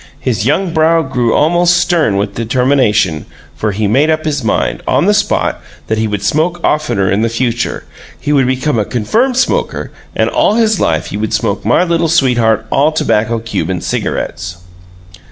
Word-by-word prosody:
His 120 -5 -1
young 170 +4 0
brow 165 0 +3
grew 125 -4 0
almost 175 +3 +3
stern 170 - +1
with 100 0 -2
determination, 115 - +1 0.3
for 105 - -1
he 105 +2 -2
made 135 +9 +2
up 155 0 0
his 145 -4 -1
mind, 110 - -1
on - - +2
the - - +4
spot, - - 0 0.2
that 110 0 -1
he 110 - 0
would 105 -1 -3
smoke 165 - 0
oftener 150 -11 0
in 100 +3 +1
the 115 - +1
future 120 +1 -2 0.4
he 150 - -1
would 135 -3 +3
become 130 0 0
a - - +2
confirmed 230 - 0
smoker, 260 - -1 0.2
and - - +1
all 210 - +2
his 220 -4 +2
life 80 -1 0
he 100 - -3
would 110 0 -3
smoke - - -2
My - - +3
Little 170 -2 0
Sweetheart 120 -8 +2
All 145 +3 +3
Tobacco 115 -7 0
Cuban 95 -6 -3
Cigarettes. 85 +2 -4
130 Hz, 175 wpm, -14 LUFS, 110-160 Hz, 0.4 s, the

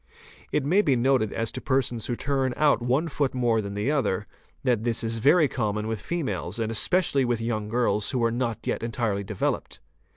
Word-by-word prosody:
It 135 - 0
may 185 +8 +4
be 140 -10 +2
noted 125 -3 +2
as 115 0 -2
to - - -6
persons 125 -4 0
who 120 - -1
turn 135 -1 -1
out 150 -4 +3
one 130 +7 +1
foot 140 -4 -1
more 120 -3 +2
than 100 0 -6
another, 105 -4 0 0.4
that 120 -5 +1
this 115 -1 0
is 115 0 -2
very 150 +6 +5
common 105 -5 -2
with 110 -2 -3
females 170 -5 -3
and 115 -1 -1
especially 140 - +2
with 120 -2 0
young 110 -2 -2
girls 105 -3 +1
who 125 -3 0
are 115 - +2
not 120 -1 -2
yet - - -1
entirely 115 -3 -1
developed. 100 0 -3
120 Hz, 195 wpm, -26 LUFS, 110-135 Hz, 0.4 s, very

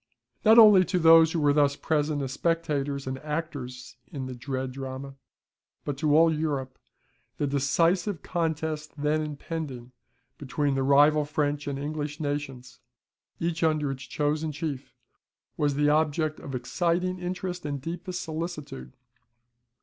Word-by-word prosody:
Not 220 +2 +7
only 210 -5 +9
to 185 +1 -1
those 165 -1 +7
who 165 - -1
were 145 -1 +3
thus 145 -1 +3
present 150 -1 0
as 130 - -4
spectators 145 -3 -1
and 130 0 -4
actors 130 -6 -5
in 135 -3 -5
the 130 - -6
dread 130 +1 -4
drama, 135 +1 -7 0.7
but 145 - -2
to 150 -1 +3
all 165 0 +5
Europe, 140 -4 -3 0.6
the - - 0
decisive 165 +6 +1
contest 160 -3 -2
then 150 +2 +1
impending 145 -4 -6 0.5
between 145 0 -1
the 135 - 0
rival 145 +3 +5
French 145 0 -2
and 140 -1 -2
English 150 +1 -4
nations, 145 -4 -4 0.6
each 165 -1 -2
under 155 -3 +1
its 135 -1 -7
chosen 150 +1 -1
chief 145 -3 -5 0.6
was 145 -2 0
the 145 +1 +3
object 155 0 +1
of 135 - -7
exciting 175 +7 -1
interest 180 0 -4
and 145 -1 -3
deepest 180 +5 -5
solicitude. 155 - -6
150 Hz, 140 wpm, -27 LUFS, 140-160 Hz, 0.7 s, only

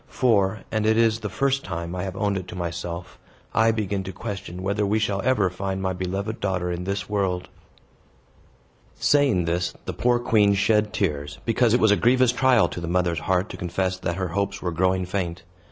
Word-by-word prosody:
For 105 -5 +2
and 110 -1 0
it 110 0 +3
is 115 -1 +3
the 105 -2 -4
first 135 +5 0
time 85 -1 -5
I 90 - -3
have 95 -1 -5
owned 100 0 0
it 95 -2 -4
to 90 - -8
myself 85 0 -5 0.3
I 110 +1 +4
begin 100 -3 -1
to 95 - -5
question 95 -3 -6
whether 100 +2 0
we 105 +2 +1
shall 100 -2 0
ever 115 -7 +3
find 95 +1 -3
my 95 -1 -1
beloved 95 +4 -3
daughter 90 -3 -1
in 90 +1 -4
this 100 +1 -3
world." 95 -3 -1 1.5
Saying 135 - +3
this, 85 +1 -1
the - - -3
poor 120 0 +2
queen 105 -4 +3
shed 105 +1 +2
tears, 75 -9 -2
because 115 0 +3
it - - +3
was 110 - +4
a - - +6
grievous 125 +1 +4
trial 125 -2 +4
to 85 - -6
the 85 - -4
mother's 85 -1 +1
heart 95 +4 0
to - - -7
confess 95 +2 -1
that 85 -2 -2
her 95 -1 -2
hopes 100 +2 -2
were 90 - -2
growing 95 +2 +1
faint. 90 -2 -3
95 Hz, 200 wpm, -24 LUFS, 90-110 Hz, 1.5 s, a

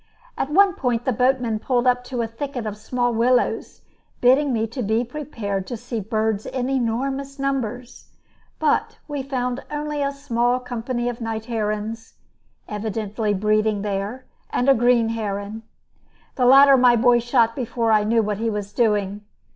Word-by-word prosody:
At 270 - -2
one 385 +4 +5
point 245 -5 -1
the 260 - +1
boatman 250 -2 +1
pulled 245 +2 0
up 250 0 +2
to 245 -2 -2
a - - -2
thicket 245 +1 -5
of 210 -1 -4
small 245 +3 -1
willows, 245 +2 +1 0.4
bidding 265 +3 +4
me 225 -2 0
be 225 -1 -1
prepared 230 -8 -4
to 240 - -4
see 240 0 -5
birds 215 0 -1
in 255 0 -2
enormous 270 +3 -2
numbers; 255 -3 -3 0.5
but - - 0
we 290 -2 -3
found 255 -1 -3
only 295 0 -3
a 280 0 0
small 245 -3 0
company 245 0 -3
of 240 -1 -4
night 225 -1 -4
herons 220 0 -3 0.5
evidently 210 0 -2
breeding 215 +1 +1
there 205 +5 -3 0.2
and 245 - -1
a 275 - +7
green 240 -1 +3
heron. 210 -1 -4 0.7
The 250 -3 +2
latter 275 +1 +8
my 245 -1 +5
boy 240 +1 +4
shot 235 -1 +2
before 235 -3 -1
I 215 -1 +4
knew 225 +1 +2
what 210 -1 -2
he 225 0 0
was 205 -1 -4
doing. 210 -3 +1
235 Hz, 160 wpm, -22 LUFS, 220-255 Hz, 0.7 s, latter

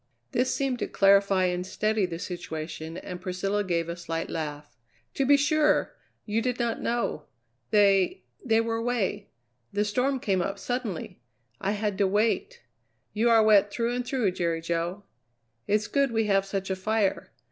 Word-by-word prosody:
This 255 -1 +1
seemed 270 -3 -1
to - - -2
clarify 195 -1 +4
and 180 0 -1
steady 215 +1 0
the 165 -2 -5
situation 165 -2 -6
and 180 -1 -7
Priscilla 195 +3 -1
gave 170 -3 -1
a 170 - -4
slight 165 -1 -4
laugh: 150 -2 -5 0.4
"To 270 - 0
be 285 0 +7
sure. 300 +2 +2 0.3
You 220 +1 0
did 250 0 -1
not 235 -2 -1
know. 235 -10 -1 0.4
They 200 - +3 0.2
they 225 -3 +3
were 230 0 -1
away. 230 -3 -1 0.4
The 205 +1 0
storm 255 +6 0
came 195 -5 0
up 195 +3 -2
suddenly. 220 - -4 0.4
I 195 +2 -1
had 210 -1 -2
to 200 - +4
wait. 225 - 0 0.5
You 225 +3 +2
are 225 -1 +6
wet 205 -2 +5
through 235 +3 -1
and 245 0 -1
through, 245 -6 0
Jerry 170 -2 -1
Jo. 170 +4 -2 0.6
It's 210 +1 +2
good 275 +2 +1
we 225 -1 +1
have 195 -1 +2
such 195 -1 -3
a - - +1
fire. 205 +1 0
205 Hz, 170 wpm, -27 LUFS, 180-235 Hz, 0.6 s, be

